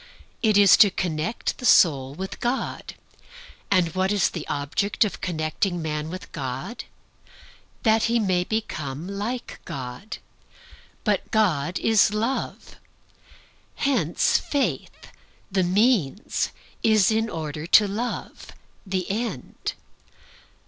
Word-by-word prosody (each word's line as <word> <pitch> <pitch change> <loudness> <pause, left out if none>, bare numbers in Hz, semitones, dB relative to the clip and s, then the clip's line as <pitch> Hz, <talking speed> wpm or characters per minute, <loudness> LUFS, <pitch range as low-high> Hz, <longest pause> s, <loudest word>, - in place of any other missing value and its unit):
It 215 -4 +4
is 200 -3 +7
to 205 - +7
connect 175 +3 -2
the - - -10
soul 135 -5 +4
with 190 +3 -6
God. 245 +2 -3 0.7
And 180 -4 +2
what 190 +1 +1
is 205 -3 +2
the 165 - -6
object 155 +10 0
of 205 - -5
connecting 175 +2 -1
man 155 -1 -3
with 185 +2 -8
God? 135 - -5 1.0
That 220 -1 +4
he 235 +1 +2
may 185 -5 +1
become 165 -8 -4
like 210 +5 -4
God. 130 - -7 0.9
But - - 0
God 180 -7 +1
is 220 -3 +4
Love. 230 +5 -3 1.0
Hence 235 - +2
Faith, 240 - -3 0.4
the 190 0 +2
means, 200 - +1 0.3
is 215 -3 +4
in 225 +1 +1
order 155 -2 -5
to 210 +3 +6
Love, 225 +5 -5 0.3
the 185 -2 -2
end. 205 - -4
190 Hz, 115 wpm, -24 LUFS, 155-220 Hz, 1.0 s, is